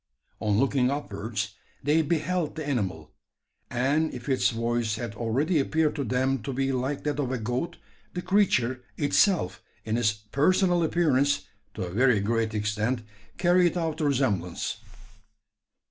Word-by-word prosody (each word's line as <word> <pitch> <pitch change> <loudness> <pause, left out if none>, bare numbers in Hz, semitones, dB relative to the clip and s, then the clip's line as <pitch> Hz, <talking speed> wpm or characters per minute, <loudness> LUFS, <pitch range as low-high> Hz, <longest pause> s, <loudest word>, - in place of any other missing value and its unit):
On 105 -2 +1
looking 130 0 +2
upwards, 105 -6 -3 0.3
they 150 +4 +3
beheld 160 +1 -1
the 155 -2 -5
animal; 95 - -2 0.6
and 140 +6 +1
if 125 0 -8
its 130 -2 +3
voice 115 -1 -1
had 115 -2 -5
already 130 +9 +1
appeared 155 +2 +1
to 140 - 0
them 130 +1 0
to 125 - -4
be 135 +1 0
like 130 +2 -2
that 150 -1 -1
of 130 -3 -1
a 130 - 0
goat, 125 +10 -3 0.4
the 180 - -3
creature 130 - +2
itself 150 - +2 0.2
in 110 +1 0
its 115 -3 +3
personal 170 - +2
appearance, 145 - +2 0.3
to 100 - -3
a 90 - -5
very 125 0 +4
great 110 +1 0
extent, 110 +3 -1 0.3
carried 175 0 +3
out 165 -3 -1
the 155 - -1
resemblance. 105 -9 0
130 Hz, 145 wpm, -27 LUFS, 110-155 Hz, 0.6 s, very